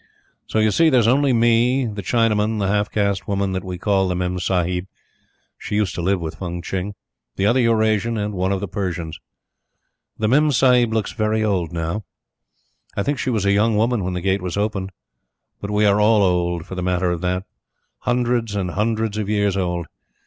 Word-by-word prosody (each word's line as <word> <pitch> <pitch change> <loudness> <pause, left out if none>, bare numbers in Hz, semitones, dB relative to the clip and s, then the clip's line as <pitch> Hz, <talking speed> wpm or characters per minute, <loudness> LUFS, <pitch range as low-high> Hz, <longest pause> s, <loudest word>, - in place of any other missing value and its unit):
So, - - -2
you 110 0 +3
see, 165 +8 +4
there 130 -4 +4
is 115 - +2
only 135 +3 +3
me, 120 +2 +3
the 105 -3 -4
Chinaman, 110 0 +1
the 100 - 0
half 105 +1 +1
caste 100 -2 -1
woman 100 -1 0
that 95 -1 -3
we 90 -2 -5
call 95 0 +1
the 90 - -1
Memsahib 90 0 -1 0.7
(she - - -4
used 105 -2 +1
to - - -4
live 95 +2 +1
with 80 -1 -4
Fung 85 -2 -5
Tching), 95 +3 -4 0.4
the 95 - 0
other 120 +5 +3
Eurasian, 115 -1 +2
and 105 0 -2
one 95 0 -1
of 95 -1 -1
the 100 - -3
Persians. 85 -4 -4 1.0
The 110 - 0
Memsahib 125 -3 +4
looks 110 -2 -1
very 110 -1 0
old 95 -6 0
now. 85 +5 -3 0.9
I 100 - +1
think 145 +4 -1
she - - -1
was 110 -5 0
a 100 - +3
young 105 +2 +3
woman 115 0 +1
when 90 0 -2
the 90 - -3
Gate 95 +1 0
was 90 +1 -4
opened; 100 -2 -2 0.7
but 100 - -6
we 105 0 +2
are 100 0 +4
all 105 -1 +4
old 85 -2 0
for - - -9
the 90 - -4
matter 90 0 0
of 85 -1 -3
that. 90 +1 -1 0.6
Hundreds 120 -3 0
and 95 -3 -2
hundreds 110 +1 -1
of 105 -1 -3
years 100 -2 +1
old. 90 -3 -1
100 Hz, 200 wpm, -21 LUFS, 90-110 Hz, 1.0 s, see